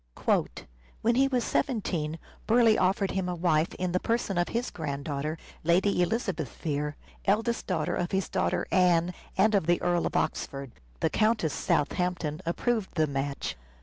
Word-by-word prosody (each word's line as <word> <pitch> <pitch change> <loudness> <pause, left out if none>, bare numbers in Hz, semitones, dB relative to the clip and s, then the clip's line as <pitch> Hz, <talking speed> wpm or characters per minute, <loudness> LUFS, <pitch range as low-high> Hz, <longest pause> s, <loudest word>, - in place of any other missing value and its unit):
" - - -16
When 235 - +4
he 270 +3 +4
was 255 -3 0
seventeen 170 - -1 0.3
Burleigh 230 -1 +5
offered 190 +1 +2
him 190 -1 -1
a 180 - -2
wife 165 -2 +1
in 180 -1 -2
the 180 - +1
person 230 -3 -1
of 175 - +2
his 235 +2 -2
granddaughter, 145 0 -3 0.3
Lady 180 +3 +3
Elizabeth 195 +2 -1
Vere, 150 -1 -2 0.3
eldest 225 +4 +1
daughter 175 -1 0
of 175 -2 -1
his 190 -1 0
daughter 175 0 0
Anne 180 -1 +3 0.2
and 215 +3 +4
of 195 -6 +2
the 175 0 +3
Earl 175 -1 +1
of - - -6
Oxford. 135 -2 -2 0.3
The - - +2
Countess 215 -8 +2
Southampton 175 0 0
approved 220 +4 -1
the 155 -2 +3
match. 140 -1 -3
180 Hz, 160 wpm, -28 LUFS, 155-205 Hz, 0.3 s, Burleigh